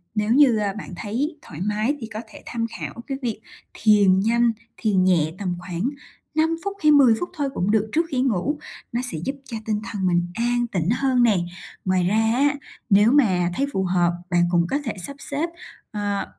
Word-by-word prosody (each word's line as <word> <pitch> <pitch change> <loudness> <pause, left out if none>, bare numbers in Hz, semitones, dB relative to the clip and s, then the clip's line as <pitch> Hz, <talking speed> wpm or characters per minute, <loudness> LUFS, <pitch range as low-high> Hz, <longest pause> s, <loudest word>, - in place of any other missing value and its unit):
nếu 210 +1 0
như, 265 -5 +6
a, 200 -2 0
bạn 200 -3 -8
thấy 265 - -3
thoải 160 0 -10
mái 215 +7 0
thì 225 - -5
có 215 - -4
thể - - -13
tham 230 -1 -2
khảo - - -5
cái 270 - -3
việc 230 -4 -2 0.3
thiền 205 -3 +4
nhanh, 235 +3 +3 0.3
thiền 200 -5 +2
nhẹ 165 -4 +2
tầm 180 -3 -2
khoảng 180 +6 -2 0.5
5 320 +1 +2
phút 400 0 -3
hay 305 - +6
10 275 -5 +7
phút 350 - -3
thôi 280 -2 0
cũng 195 -2 0
được 220 0 +1
trước 330 +2 +2
khi 255 -3 0
ngủ, 265 +5 0 0.3
nó 240 - -1
sẽ 160 - -4
giúp 275 - -2
cho 230 - -5
tinh 215 -1 0
thần 200 -4 -3
mình 175 0 +2
an 240 +1 0
tĩnh 175 -2 0
hơn 255 0 +2
nè. 215 -5 +4 0.5
Ngoài 185 -1 +2
ra 205 - +1 0.2
á, 285 +3 +2 0.3
nếu 210 +3 +6
mà 185 -11 +3
thấy 275 - +1
phù 190 - 0
hợp, 175 -1 +2 0.2
bạn 175 -1 +3
cũng 170 -1 +2
có 275 - 0
thể 225 - -2
sắp 280 - -8
xếp, 295 +5 -3 0.4
ờ, 205 -2 -2
220 Hz, 210 wpm, -23 LUFS, 185-265 Hz, 0.5 s, 10